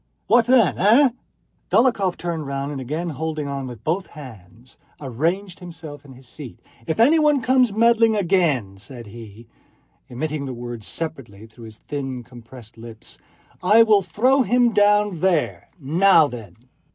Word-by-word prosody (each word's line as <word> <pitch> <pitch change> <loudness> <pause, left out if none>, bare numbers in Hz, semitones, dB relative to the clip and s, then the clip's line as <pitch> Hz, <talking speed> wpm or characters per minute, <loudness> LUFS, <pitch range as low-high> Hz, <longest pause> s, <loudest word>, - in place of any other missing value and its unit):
What 240 -1 +3
then?... 245 -6 +3
Eh?" 235 +9 +5 0.6
Dólokhov 225 -7 +2
turned 165 -4 -5
round 140 +1 -4
and, 140 -2 -6
again 155 +7 -4
holding 155 0 -4
on 140 -1 -5
with 120 -3 -11
both 175 +5 -2
hands, 115 -4 -14 0.2
arranged 165 - -3
himself 160 -5 -10
on 140 -2 -14
his 130 0 -16
seat. 130 -1 -11 0.3
"If 160 - -3
anyone 300 +3 +4
comes 255 -2 +3
meddling 230 +1 +3
again," 165 - 0
said 120 +3 -11
he, 110 +1 -13 0.6
emitting 145 +3 -4
the 130 -2 -6
words 120 -2 -8
separately 130 -11 -7
through 115 +1 -15
his 110 -1 -12
thin 135 -4 -6
compressed 120 -2 -14
lips, 115 -1 -12 0.4
"I 215 +5 +5
will 215 -3 +3
throw 245 - +1
him 245 -1 +2
down 205 -3 +2
there. 175 -3 -1
Now 165 +4 +4
then!" 115 -10 -9
155 Hz, 150 wpm, -21 LUFS, 125-205 Hz, 0.6 s, Eh